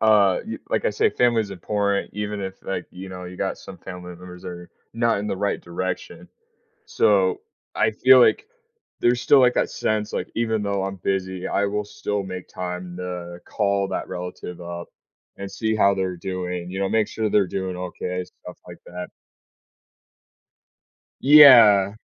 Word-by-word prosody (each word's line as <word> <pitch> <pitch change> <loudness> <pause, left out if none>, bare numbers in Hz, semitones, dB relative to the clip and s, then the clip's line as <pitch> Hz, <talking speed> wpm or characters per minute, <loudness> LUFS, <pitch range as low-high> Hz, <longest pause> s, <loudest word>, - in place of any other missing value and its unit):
uh, 105 -4 +4
y - - -5
like - - -1
I - - +2
say, - - +2
family 120 -2 +2
is 105 - -4
important, 100 +2 -1
even 105 0 -4
if, 95 -1 -7
like, 90 -2 -4
you 95 +1 -9
know, 90 -1 -8
you 90 0 -9
got - - -2
some - - -11
family 90 -1 -9
members 90 0 -12
that - - -6
are 90 0 -10 0.2
not 115 -2 +1
in 105 - -4
the 95 - -2
right 100 +1 -1
direction. 90 +1 -5 0.6
So, 95 -3 +2 0.3
I 110 - +2
feel 130 +4 +6
like 125 - +4 0.5
there's 120 0 +2
still, 140 - +5
like, 125 -1 +5
that - - +1
sense, 110 0 -2
like, - - -3
even 110 -2 0
though 100 -1 -1
I'm 95 0 -3
busy, 95 0 -2
I 100 - +1
will 105 +1 -2
still 105 -1 -3
make 95 -1 -7
time 90 -1 -6
to 90 -1 -6
call 100 -2 0
that - - -3
relative 90 -1 -7
up 85 0 -7 0.5
and 100 0 -6
see 110 -1 -1
how 100 -2 +4
they're 95 -2 -2
doing, 90 -1 -4
you 95 - -4
know, 95 - 0
make 110 -2 +2
sure 110 -1 -2
they're 100 -2 +3
doing 95 -1 -4
okay, 90 0 -4
stuff 90 0 -13
like 85 - -11
that. 90 0 -7 2.1
Yeah. 115 -9 +8
95 Hz, 175 wpm, -23 LUFS, 90-105 Hz, 2.1 s, Yeah